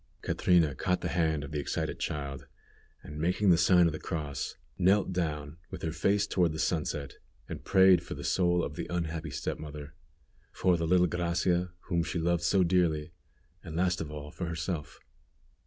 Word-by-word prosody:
Catrina 85 -5 +3
caught 90 +7 -1
the 85 - -2
hand 80 -4 +1
of 75 - -8
the 75 - -2
excited 70 - -3
child, 70 -2 -4 0.6
and 75 0 -8
making 90 +4 +2
the - - +7
sign 90 0 +5
of 85 - +1
the 80 - -5
cross, 75 -6 -4 0.2
knelt 95 +1 +3
down 75 -3 -3
with - - -8
her 80 - -1
face 100 +5 +1
toward 90 -5 +1
the - - -5
sunset, 75 -4 -2 0.3
and - - -7
prayed 95 -2 +6
for - - -7
the - - -7
soul 90 -2 +2
of 75 - -4
the - - -4
unhappy 80 -2 -3
step 70 0 -4
mother, 75 -1 -8 0.6
for 90 -1 +2
the 85 -1 -1
little 90 +1 +4
Gracia, 85 +1 0
whom 85 -2 0
she 85 - -3
loved 85 +2 +2
dearly, 85 -4 +1 0.5
and 80 -3 -7
last 90 0 +1
of 80 - -5
all 75 -1 -7
for 85 - -5
herself. 85 -2 -4
85 Hz, 180 wpm, -30 LUFS, 75-90 Hz, 0.6 s, the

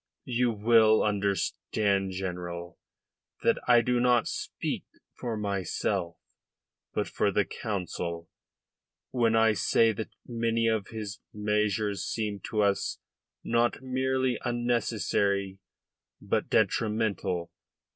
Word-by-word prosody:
You 125 0 +1
will 110 0 +5
understand, 100 -1 0
General, 90 -2 -5 0.6
that - - +3
I 120 -1 +7
do 125 +1 +1
not 120 -1 +3
speak - - -3 0.3
for 115 -3 -4
myself, 100 -3 -2 0.7
but - - -1
for - - +1
the - - +2
Council, 85 -4 -4 0.8
when 115 -3 +2
I 110 -1 +5
say 115 +3 +3
that 110 +1 -5 0.2
many 115 -1 0
of 110 -2 0
his 105 -3 -6
measures 105 -1 0
seem 105 -3 -2
to 105 -1 +1
us 100 -1 +1 0.5
not 120 +2 +1
merely 130 -1 0
unnecessary, 105 -5 0 0.6
but - - -1
detrimental. 100 -6 0
105 Hz, 105 wpm, -28 LUFS, 100-115 Hz, 0.8 s, I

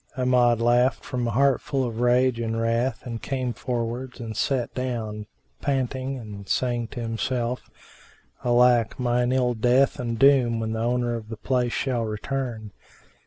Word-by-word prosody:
Amjad 125 -2 +3
laughed 120 +2 +2
from 125 -2 -2
a - - 0
heart 135 +3 +3
full 135 -2 -1
of 115 -2 -3
rage 125 0 +3
and 115 -1 -2
wrath 115 +4 0
and 115 -2 -5
came 130 -3 -2
forwards 120 +1 -4
and 115 -2 -6
sat 130 -4 -1
down, 110 -5 -4 0.3
panting 135 -1 -1
and 105 -4 -9
saying 120 -2 0
to 120 - -7
himself, 120 +2 -2 0.7
"Alack, 120 -1 +3
mine 125 0 +1
ill 125 -1 +2
death 125 +5 +2
and 115 -2 -2
doom 125 -3 +4
when 110 0 -2
the 110 - -2
owner 120 0 0
of 110 -2 -6
the 115 - -6
place 125 +1 0
shall 125 -4 -1
return!" 110 0 -4
120 Hz, 160 wpm, -25 LUFS, 115-130 Hz, 0.7 s, doom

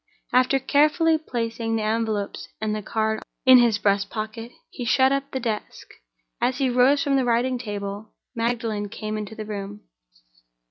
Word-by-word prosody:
After 255 +2 +4
carefully 305 +4 +3
placing 230 -5 -3
the 220 - -1
envelopes 215 -2 -2
and 215 0 -1
the 215 - -3
card 220 +1 -1 0.2
in 260 -1 +9
his 235 -3 +3
breast 200 -1 +1
pocket, 225 +2 -5 0.2
he 245 - -6
shut 260 +3 +3
up 275 0 -1
the 265 - -3
desk. 225 -4 -5 0.5
As 255 0 +1
he 265 -2 +1
rose 265 +4 +4
from 280 -2 +2
the 265 - +2
writing 245 +1 +1
table, 205 -1 -6 0.2
Magdalen 230 -3 -2
came 215 0 -5
into 215 0 -5
the 215 - -6
room. 205 0 -6
230 Hz, 165 wpm, -24 LUFS, 215-255 Hz, 0.5 s, in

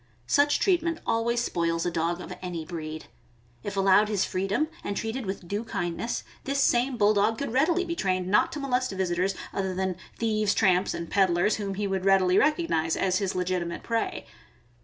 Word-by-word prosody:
Such 285 - +3
treatment 335 -3 +1
always 235 +1 +1
spoils 165 -3 -1
a 175 - 0
dog 170 +2 -1
of - - -7
any 175 -3 -5
breed. 155 -2 -6 0.6
If 200 +5 -5
allowed 195 +2 +4
his 200 -3 +1
freedom 195 +11 -1 0.2
and 200 - -3
treated 225 0 -3
with 190 -2 -5
due 205 +4 -2
kindness, 225 +1 -3 0.2
this 275 +1 -1
same 250 -1 +2
Bulldog 210 +1 +3
could 280 -3 -4
readily 335 +7 +2
be 335 -1 -3
trained 185 - 0
not 200 +3 +3
to 300 - -4
molest 255 -3 0
visitors, 185 0 0 0.2
other 190 -1 -2
than 190 -1 -1 0.2
thieves, 215 -2 +1
tramps, 185 -2 +2
and 170 - -5
peddlers, 185 +1 +2
whom 200 -2 -3
he 205 +1 -2
would 190 -1 -1
readily 190 -1 +4
recog 310 - +3
nize 160 0 +1
as 185 0 +1
his 195 -2 -2
legitimate 180 -2 -2
prey. 230 -1 -2
195 Hz, 180 wpm, -27 LUFS, 180-235 Hz, 0.6 s, allowed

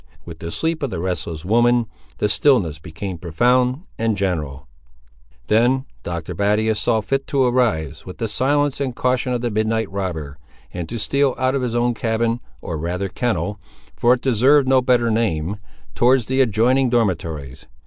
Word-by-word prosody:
With 80 -2 -10
the 85 - -5
sleep 160 - -2
of 140 - -1
the 90 - -4
restless 85 -2 -3
woman, 120 +3 +3 0.3
the - - +1
stillness 105 - +2
became 85 +3 -6
profound 125 - +1 0.2
and 115 -2 0
general. 75 -8 -2 0.8
Then 125 +5 +2 0.2
Dr. 85 -2 -5
Battius 105 +2 +1
saw 110 -1 +1
fit 135 +6 -2
to 140 -2 +2
arise, 120 - 0
with 90 - -9
the 115 - -2
silence 140 +5 +1
and 130 -3 -2
caution 125 0 0
of 120 -1 -1
the 120 -1 -1
midnight 110 0 0
robber, 80 -8 -4 0.3
and 90 -2 -5
to 115 - -4
steal 140 +4 +1
out 130 0 +1
of 140 - 0
his 120 -2 -2
own 120 0 +2
cabin, 115 +1 0 0.2
or 80 -3 -4
rather 90 +4 -2
kennel, 105 -2 -2 0.4
for 120 +1 +4
it 125 - -11
deserved 135 +3 +4
no 130 -1 +4
better 120 -2 +2
name, 100 -4 0 0.4
towards 125 0 +3
the 130 +3 +1
adjoining 125 +3 +3
dormitories. 80 - -2
115 Hz, 170 wpm, -21 LUFS, 90-125 Hz, 0.8 s, for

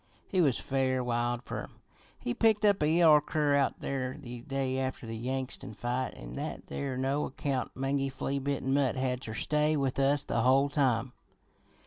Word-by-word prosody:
He 185 - +2
was 140 -7 +3
fair 130 -1 0
wild 120 0 -1
fer - - -4
'em. - - -10 0.4
He 120 - -3
picked 220 - +3
up 200 -4 +4
a 150 - +3
yeller 160 -2 +6
cur 150 -1 +1
out 140 -1 +1
there 130 -1 -3
the 120 -4 -8
day 135 0 -2
after 130 -2 -3
the 115 0 -5
Yangtsin 130 0 -3
fight, 125 +3 -2
an' - - -9
that - - -5
there 135 -2 -4
no 135 +3 0
account, 135 -1 -3
mangy, 135 +1 0
flea 135 +1 -2
bitten 135 -1 -1
mutt 135 -3 +2
had 130 -1 -1
ter 110 -4 -5
stay 150 +4 +1
with 135 -1 -1
us 140 +1 +3
the 115 - 0
whole 135 +3 +4
time. 130 -4 +1
135 Hz, 185 wpm, -30 LUFS, 125-140 Hz, 0.4 s, yeller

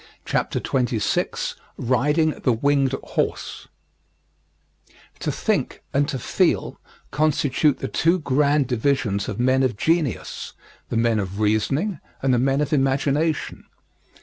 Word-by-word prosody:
] - - -37
CHAPTER - - -1
XXVI 120 -4 -1 0.2
RIDING 150 +6 +2
THE 125 - +3
WINGED 135 +2 +2
HORSE - - -3 1.5
To - - -1
think, - - -1
and 140 +1 +2
to 135 - -2
feel, 125 - 0 0.3
constitute 150 -1 +2
the - - -4
two 170 +3 +2
grand 145 -1 +2
divisions 120 -5 0
of 105 - -5
men 130 +2 +3
of 125 -5 0
genius 160 - -1 0.4
the 115 - -1
men 115 -1 +2
of 100 0 -4
reasoning 135 - +1 0.2
and 135 -1 +3
the 120 - +3
men 135 +3 +2
of 150 +1 -1
imagination. 140 +3 0
135 Hz, 125 wpm, -23 LUFS, 120-150 Hz, 1.5 s, THE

